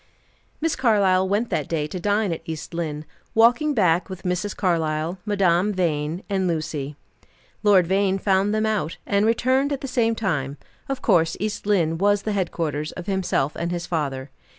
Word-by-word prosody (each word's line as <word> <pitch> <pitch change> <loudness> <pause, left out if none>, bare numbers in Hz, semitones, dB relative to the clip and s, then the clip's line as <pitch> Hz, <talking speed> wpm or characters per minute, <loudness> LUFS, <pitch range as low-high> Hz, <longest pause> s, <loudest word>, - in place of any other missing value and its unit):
Miss 325 0 0
Carlyle 195 -6 +3
went 210 +4 0
that 150 - -1
day 155 -3 0
to 180 +4 -5
dine 205 0 +1
at 165 - -6
East 160 +1 -7
Lynne, 155 -3 -3 0.3
walking 245 +7 +4
back 180 -5 +2
with 185 -1 -8
Mrs. 180 +3 -2
Carlyle, 165 -1 0
Madame 195 -1 +2
Vine 165 -2 -1
and 190 -2 0
Lucy. 155 -4 -3 0.7
Lord 200 -4 +5
Vane 195 +2 +1
found 195 +1 +2
them 215 0 +1
out, 210 -7 -1
and 200 +2 +2
returned 260 +5 +2
at 280 - -2
the 270 - -4
same 230 -3 +1
time; 150 -10 -2 0.3
of 270 -1 -3
course 165 -6 +3
East 210 0 -3
Lynne 165 -6 +2
was 205 +1 +2
the 215 - -1
headquarters 160 -6 -2
of 180 - -7
himself 190 -7 0
and 170 +1 -3
his 175 -1 -3
father. 140 -5 -3
185 Hz, 175 wpm, -23 LUFS, 165-210 Hz, 0.7 s, Lord